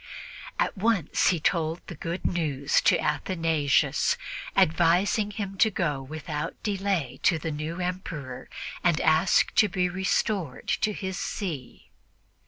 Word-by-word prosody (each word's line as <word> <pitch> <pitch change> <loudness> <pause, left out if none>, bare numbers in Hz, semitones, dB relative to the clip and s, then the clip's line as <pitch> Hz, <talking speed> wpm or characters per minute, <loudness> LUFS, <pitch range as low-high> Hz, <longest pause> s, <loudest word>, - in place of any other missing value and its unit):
At - - 0
once 200 -5 +1
he 175 - +3
told 160 +1 0
the - - -7
good 170 +3 -5
news 145 -5 +1
to - - +5
Athanasius, 160 -2 +1 0.4
advising 175 +6 +3
him 200 -2 -5
to 220 - +6
go 150 -8 -1
without 150 +3 -5
delay 195 - -1
to 170 - +3
the 160 +1 -4
new 155 +4 -4
Emperor 170 -8 -5 0.3
and 170 -3 +3
ask 160 +4 +3
to 210 - +5
be 180 -1 0
restored 190 - -1
to 210 - +1
his 190 -2 -4
see. 160 - -5
170 Hz, 130 wpm, -27 LUFS, 155-190 Hz, 0.4 s, to